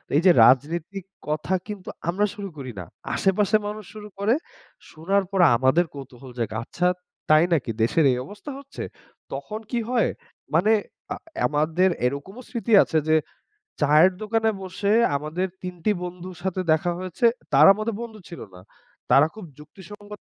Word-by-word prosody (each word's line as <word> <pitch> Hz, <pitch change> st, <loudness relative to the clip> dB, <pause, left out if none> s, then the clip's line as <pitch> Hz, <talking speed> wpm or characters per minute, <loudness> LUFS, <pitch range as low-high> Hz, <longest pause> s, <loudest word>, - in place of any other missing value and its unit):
এই 150 Hz, -, +4 dB
যে 185 Hz, -, +9 dB
রাজনীতিক 165 Hz, -, +1 dB, 0.2 s
কথা 155 Hz, +5 st, -1 dB
কিন্তু 205 Hz, -3 st, -7 dB, 0.2 s
আমরা 195 Hz, +4 st, +2 dB
শুরু 200 Hz, -1 st, -6 dB
করি 130 Hz, -3 st, -6 dB
না। 90 Hz, -, -6 dB, 0.3 s
আশেপাশের 210 Hz, +2 st, +2 dB
মানুষ 210 Hz, 0 st, -6 dB
শুরু 210 Hz, -1 st, -9 dB
করে, 205 Hz, +3 st, +2 dB, 0.6 s
শোনার 195 Hz, +6 st, 0 dB
পরে 190 Hz, -3 st, +4 dB
আমাদের 130 Hz, +8 st, +3 dB
কৌতূহল 130 Hz, -2 st, -11 dB
জাগে। 110 Hz, -2 st, -3 dB
আচ্ছা 180 Hz, +7 st, -1 dB, 0.4 s
তাই 155 Hz, +1 st, +6 dB
নাকি 125 Hz, -7 st, 0 dB
দেশের 145 Hz, +8 st, +3 dB
এই 125 Hz, -, 0 dB
অবস্থা 210 Hz, -, -9 dB
হচ্ছে, 280 Hz, 0 st, -8 dB, 0.5 s
তখন 215 Hz, 0 st, -5 dB
কি 240 Hz, -, 0 dB
হয় 245 Hz, -2 st, +2 dB, 0.5 s
মানে 195 Hz, +7 st, +4 dB, 0.4 s
আ -, -, -4 dB, 0.3 s
আমাদের 155 Hz, +5 st, +2 dB, 0.2 s
এরকমও 140 Hz, -, -4 dB
স্মৃতি 235 Hz, -1 st, -2 dB
আছে, 160 Hz, -, -1 dB
যে 155 Hz, -, +4 dB, 0.7 s
চায়ের 150 Hz, +5 st, +6 dB
দোকানে 225 Hz, +1 st, +1 dB
বসে 190 Hz, +2 st, -2 dB, 0.2 s
আমাদের 155 Hz, +6 st, -2 dB, 0.2 s
তিনটি 180 Hz, +2 st, -2 dB
বন্ধুর 180 Hz, +1 st, -7 dB
সাথে 190 Hz, -1 st, -1 dB
দেখা 160 Hz, +3 st, +2 dB
হয়েছে। 185 Hz, +5 st, -2 dB, 0.3 s
তারা 145 Hz, +5 st, +8 dB
আমাদের 215 Hz, +1 st, -3 dB
বন্ধু 225 Hz, -2 st, -8 dB
ছিল 170 Hz, -, -9 dB
না। 90 Hz, -, -12 dB, 0.5 s
তারা 140 Hz, -, +7 dB
খুব 215 Hz, -4 st, -9 dB
যুক্তিসঙ্গত 205 Hz, +6 st, -12 dB
180 Hz, 155 wpm, -24 LUFS, 150-205 Hz, 0.7 s, যে